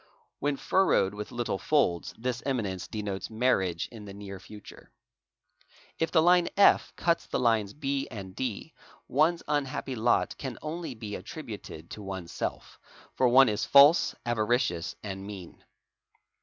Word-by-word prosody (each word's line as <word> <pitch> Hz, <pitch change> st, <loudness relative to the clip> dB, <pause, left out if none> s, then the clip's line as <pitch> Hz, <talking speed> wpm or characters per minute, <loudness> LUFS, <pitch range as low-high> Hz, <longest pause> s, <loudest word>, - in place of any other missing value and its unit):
Whe 145 Hz, 0 st, 0 dB
furrowed 185 Hz, -, +2 dB
with 105 Hz, 0 st, -7 dB
little 120 Hz, -5 st, -2 dB
folds, 95 Hz, -, +1 dB
this 125 Hz, +1 st, -3 dB
eminence 105 Hz, -9 st, -2 dB
denotes 100 Hz, -3 st, -4 dB
marriage 110 Hz, -7 st, +1 dB
in 110 Hz, -3 st, -10 dB
the 100 Hz, -1 st, -9 dB
neg 100 Hz, -2 st, -8 dB
future. 105 Hz, -1 st, -13 dB, 1.1 s
If 165 Hz, -, +1 dB
the 160 Hz, -2 st, +4 dB
line 175 Hz, 0 st, +5 dB
F 200 Hz, -, +5 dB
cuts 170 Hz, -1 st, 0 dB
the -, -, -1 dB
lines 110 Hz, -4 st, +2 dB
B 140 Hz, -2 st, -2 dB
and 95 Hz, -4 st, -8 dB
D, 130 Hz, +5 st, -4 dB, 0.3 s
one's 160 Hz, +5 st, +2 dB
unhappy 140 Hz, -2 st, -2 dB
lot 120 Hz, 0 st, +1 dB
can 130 Hz, -4 st, -5 dB
onl 160 Hz, -4 st, -5 dB
be 105 Hz, -2 st, -6 dB
attributed 80 Hz, -4 st, -8 dB
to'oneself, 95 Hz, -4 st, -6 dB, 0.3 s
for 130 Hz, -, +3 dB
one 135 Hz, +2 st, +7 dB
is 105 Hz, -1 st, -1 dB
false, 140 Hz, +4 st, +6 dB
avaricious, 115 Hz, -6 st, 0 dB
and 95 Hz, -2 st, -5 dB
mean. 95 Hz, -4 st, -10 dB
115 Hz, 140 wpm, -28 LUFS, 100-140 Hz, 1.1 s, one